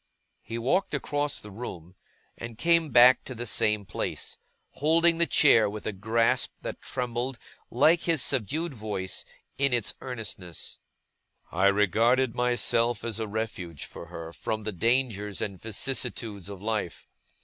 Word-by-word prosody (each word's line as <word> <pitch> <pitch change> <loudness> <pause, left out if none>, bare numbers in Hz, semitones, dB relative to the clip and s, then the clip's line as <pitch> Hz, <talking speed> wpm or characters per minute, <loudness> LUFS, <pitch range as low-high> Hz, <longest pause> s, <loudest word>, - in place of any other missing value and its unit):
He 115 - -6
walked 145 +9 +1
across 145 0 -1
the 105 - -10
room, 90 -6 -8 0.4
and 115 -1 -8
came 165 +2 +3
back 125 0 +7
to 130 - -6
the 120 +1 -3
same 105 -2 +2
place; - - -3 0.4
holding 165 +3 +3
the 170 - +5
chair 115 -8 +5
with 105 +1 -7
a - - -1
grasp 110 +4 +1
that - - -5
trembled, 125 +1 -3 0.3
like 155 +8 +4
his 165 -3 +1
subdued 145 - -1
voice, 105 -5 -3 0.4
in 140 -2 +3
its 120 -4 +1
earnestness. 110 -9 -5 0.7
'I 95 +3 +3
regarded 115 +6 +3
myself 120 -1 +1
as 115 -1 -3
a 110 - -2
refuge, 100 -7 -4
for 85 - -10
her, 85 -1 -8
from 110 +4 -3
the 110 - -2
dangers 105 -1 0
and 95 -3 -4
vicissitudes 110 -3 -2
of 100 -1 -9
life. 105 -6 -3
115 Hz, 145 wpm, -27 LUFS, 105-130 Hz, 0.7 s, back